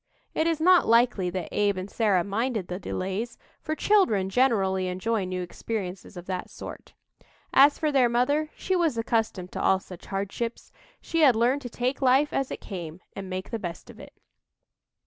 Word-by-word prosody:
It 320 - +1
is 330 -2 0
not 360 +2 +5
likely 230 -5 +3
that 180 -1 -4
Abe 205 -2 +1
and 185 +1 -4
Sarah 205 -4 +2
minded 215 0 -2
the 180 +1 -4
delays, 195 +5 -4 0.2
for 310 - -3
children 225 - +2
generally 195 -7 +2
enjoy 190 +3 -1
new 180 0 -3
experiences 190 0 -5
of 175 - -8
that 185 -1 -4
sort. - - -10 0.6
As 285 +2 +6
for 305 -1 0
their 260 -4 +4
mother, 285 +6 +1
she 375 - -1
was 330 -8 +1
accustomed 220 -5 -1
to - - -4
all 190 - +3
such 180 -2 -12
hardships; 200 +4 -4 0.3
she 330 - -2
had 270 -6 +6
learned 245 +5 +2
to 245 - -6
take 250 +4 -2
life 265 +3 +3
as 270 -1 0
it - - -6
came 175 -4 -7 0.2
and 195 -1 -6
make 185 +1 -5
the 230 - -2
best 175 -4 -7
of - - -17
it. - - -12
225 Hz, 185 wpm, -26 LUFS, 185-260 Hz, 0.6 s, As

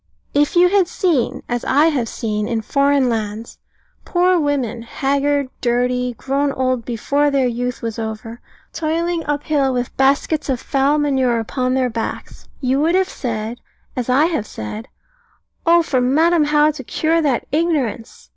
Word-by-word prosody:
If 290 +3 +2
you 355 +1 +6
had 390 -2 +3
seen, 285 -8 0
as 240 0 -2
I 295 +4 +4
have 255 -7 -1
seen, 210 -2 -2
in 225 -2 -2
foreign 280 +2 +2
lands, 220 -1 -4 0.4
poor 360 0 +2
women, 270 -6 -1
haggard, 280 +3 0
dirty, 250 0 0
grown 280 +1 0
old 255 -3 -1
before 285 +5 0
their 275 -2 +2
youth 245 0 -3
was 230 -1 -4
over, 220 +1 -6 0.3
toiling 330 +1 -1
up 290 0 -1
hill 280 -3 +1
with 245 -1 -3
baskets 280 +3 +1
of 260 -2 0
foul 275 +3 +1
manure 265 -5 +1
upon 255 +3 -1
their 255 -2 +1
backs, 225 0 -6
you 260 +1 +1
would 325 +4 +2
have 380 0 +2
said, 225 -1 -4 0.4
as 250 -1 -3
I 270 +5 +4
have 315 -11 -1
said, 160 - -7 0.8
"Oh 340 0 +6
for 260 -5 0
Madam 315 +5 +3
How 300 +1 +3
to 290 -3 -9
cure 325 +6 0
that 280 -6 0
ignorance! 290 -8 -2
270 Hz, 160 wpm, -19 LUFS, 240-300 Hz, 0.8 s, you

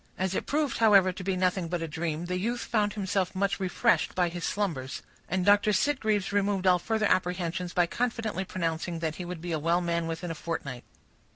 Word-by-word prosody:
As 190 0 -1
it - - -2
proved, 295 -3 0
however, 200 -4 +6
to 185 +1 -8
be 190 0 0
nothing 180 -1 +1
but 170 0 -2
a - - -3
dream, 160 +1 -3
the 180 +1 -2
youth 235 +5 -1
found 210 -3 0
himself 190 -2 -1
much 195 -1 0
refreshed 185 -2 +1
by 180 -2 +2
his 175 0 -6
slumbers; 150 -11 -2 0.3
and 185 0 0
Dr. 205 +1 +5
Sitgreaves 215 -3 +1
removed 200 -1 +1
all 180 -1 +5
further 220 +4 0
apprehensions 180 -1 0
by 175 -1 +3
confidently 225 -1 -2
pronouncing 170 -2 -2
that 160 -1 -3
he 180 - -5
would 175 -2 -6
be 175 0 -4
a 160 - 0
well 170 +3 +2
man 170 -1 -1
within 165 +1 -4
a - - -2
fortnight. 150 -6 -5
180 Hz, 205 wpm, -28 LUFS, 170-205 Hz, 0.3 s, however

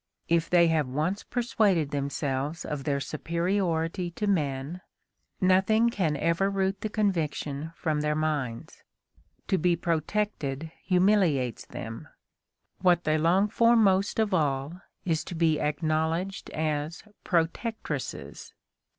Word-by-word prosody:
If 165 -1 +2
they 175 -1 +6
have 155 -4 +1
once 155 +10 -1
persuaded 205 - +1
themselves 140 +1 -2
of 145 -3 -4
their 140 -1 +1
superiority 170 +3 -1
to 190 +5 -4
men, 150 -3 -1 0.6
nothing 195 +5 +4
can 165 -9 0
ever 170 +6 +1
root 195 0 -1
the 215 - -2
conviction 160 -7 -1
from 155 -3 -1
their 150 0 0
minds. 150 -7 -3 0.7
To 190 - +2
be 175 +1 +3
protected 160 -3 -2
humiliates 180 - +2
them; 115 0 -7 0.7
what 175 -2 +3
they 155 0 +2
long 180 +6 +3
for 230 +2 +4
most 200 -3 +3
of 215 -3 +1
all 150 +1 0 0.2
is 160 -3 0
to 175 - -6
be 160 -2 +2
acknowledged 160 +5 -1
as 155 0 -2 0.2
protectresses. 180 +6 -3
165 Hz, 120 wpm, -27 LUFS, 150-190 Hz, 0.7 s, they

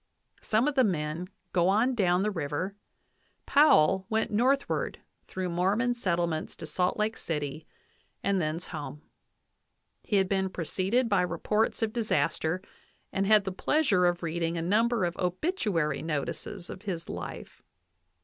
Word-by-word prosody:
Some 225 +5 +2
of 295 - +1
the 265 -1 +4
men 165 -3 -1 0.3
go 175 -1 +3
on 225 +6 +3
down 185 -5 +2
the 210 - +1
river; 165 +3 -3 0.7
Powell 190 - +5
went 220 +1 0
northward 260 +6 +1 0.3
through 185 -1 -3
Mormon 200 +8 +1
settlements 170 -8 -1
to - - -8
Salt 180 +3 0
Lake 215 +1 0
City, 150 -1 -4 0.6
and 195 -2 +1
thence 155 +3 -2
home. 150 -2 -7 1.0
He 210 - -2
had 190 -1 +3
been 190 0 0
preceded 190 +8 0
by 200 -4 +3
reports 210 +7 0
of 220 -1 -1
disaster, 180 -5 0 0.5
and 195 0 0
had 215 -1 +6
the 190 - -3
pleasure 200 - +2
of 175 0 -1
reading 165 0 -1
a - - -1
number 220 +3 +2
of 175 0 -2
obituary 185 - 0
notices 165 +4 -4
of - - -9
his 175 -5 -4
life. - - -7
185 Hz, 145 wpm, -29 LUFS, 170-215 Hz, 1.0 s, had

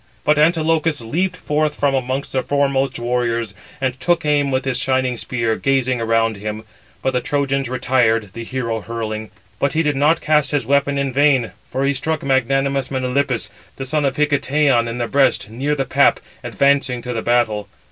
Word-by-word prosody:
But 150 0 +3
he 150 - +5
(Antilochus) 160 -1 +2
leaped 175 +11 -2
forth 150 -1 -1
from 140 -1 +2
amongst 130 +1 -2
the 130 - +1
foremost 135 -1 0
warriors, 120 -2 -1 0.3
and 130 -1 -2
took 175 +3 +1
aim 145 -1 +2
with 130 0 -1
his 130 -2 -1
shining 130 0 0
spear, 115 -1 -1
gazing 130 -3 +1
around 115 -1 +1
him; 105 +1 -5 0.4
but 130 - 0
the 125 - 0
Trojans 140 -2 -1
retired, 125 -4 +1
the 115 - -6
hero 115 -2 -3
hurling. 110 -1 -5 0.3
But 140 - +1
he 160 - +1
did 150 -2 0
not 150 +4 +3
cast 150 -1 +2
his 145 -2 0
weapon 140 0 +1
in 140 -2 -1
vain, 135 -4 +3 0.2
for 135 +1 -1
he 140 - +2
struck 155 +4 -2
magnanimous 135 0 +1
Melanippus, 130 -4 -1 0.2
the 135 - -5
son 150 +3 0
of 135 -2 0
Hicetaon, 145 -4 +2
in 115 +1 -4
the 120 -1 -2
breast, 135 -6 +1
near 140 +6 -1
the 135 -2 -1
pap, - - +3 0.2
advancing 140 -3 +1
to 125 - -4
the 115 - -2
battle. 110 -4 0
135 Hz, 185 wpm, -19 LUFS, 120-140 Hz, 0.4 s, he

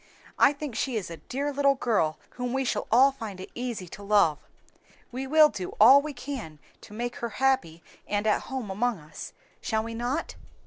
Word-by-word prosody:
I - - +7
think 290 -2 -6
she 255 +2 -2
is 200 -6 -3
a 165 - -7
dear 280 - -4
little 280 0 +3
girl 210 -12 0
whom 250 0 -4
we 265 0 0
shall - - -1
all 260 +4 +6
find 220 -8 -8
it 190 - -9
easy 240 -7 -4
to 200 - -10
love. 200 -7 +3 0.7
We 260 +2 -4
will 305 +2 +6
do 185 -9 -6
all 260 +6 +9
we 305 +1 -5
can 245 - -7 0.3
to - - -12
make 240 +2 -4
her 235 - -3
happy 205 -12 +1 0.2
and 205 +1 -1
at 215 - +2
home 260 -7 -5
among 235 +3 0
us, 150 -1 -10 0.3
shall 220 -1 -1
we 230 0 -6
not?" 245 +7 -2
240 Hz, 195 wpm, -27 LUFS, 205-270 Hz, 0.7 s, all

